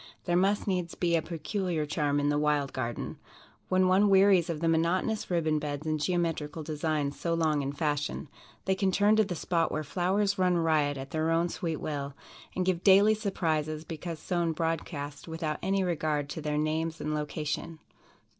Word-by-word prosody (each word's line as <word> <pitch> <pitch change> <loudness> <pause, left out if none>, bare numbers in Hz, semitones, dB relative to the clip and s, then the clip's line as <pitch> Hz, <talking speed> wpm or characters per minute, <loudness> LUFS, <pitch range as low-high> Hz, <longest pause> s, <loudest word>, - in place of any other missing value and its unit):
There 175 - +1
must 195 +3 +2
needs 180 -4 -1
be 170 -1 +1
a 165 - +2
peculiar 170 0 -2
charm 145 -1 0
in 145 0 +1
the 145 0 +2
"Wild 150 -2 +1
Garden." 120 -3 -4 0.5
When 185 0 +3
one 195 +3 +4
wearies 190 -3 +5
of 165 -3 -2
the 165 - 0
monotonous 170 +6 +1
ribbon 160 -3 +1
beds 145 0 -4
and 155 -1 0
geometrical 165 -2 -1
designs 150 -2 -2
so 170 -1 0
long 155 -3 +1
in 140 0 -2
fashion, 145 +1 -2 0.4
they 190 - +2
can 190 0 +1
turn 205 +3 +4
to 220 - +6
the 190 -3 -4
spot 165 0 0
where 155 - -2
flowers 190 +5 0
run 180 -1 +3
riot 155 -4 +2
at 135 +1 -7
their 160 0 0
own 165 +1 +2
sweet 165 -2 -3
will, 140 -2 -4 0.4
and 185 - 0
give 180 -2 0
daily 200 +2 +7
surprises 160 -7 -1
because 165 +1 -6
sown 170 0 -1
broadcast 155 -3 -3
without 160 -2 -3
any 195 0 +1
regard 155 -4 -1
to 160 - -5
their 150 0 -1
names 160 +1 -1
and 150 - -2
location. 150 +2 -3
165 Hz, 185 wpm, -29 LUFS, 150-180 Hz, 0.5 s, daily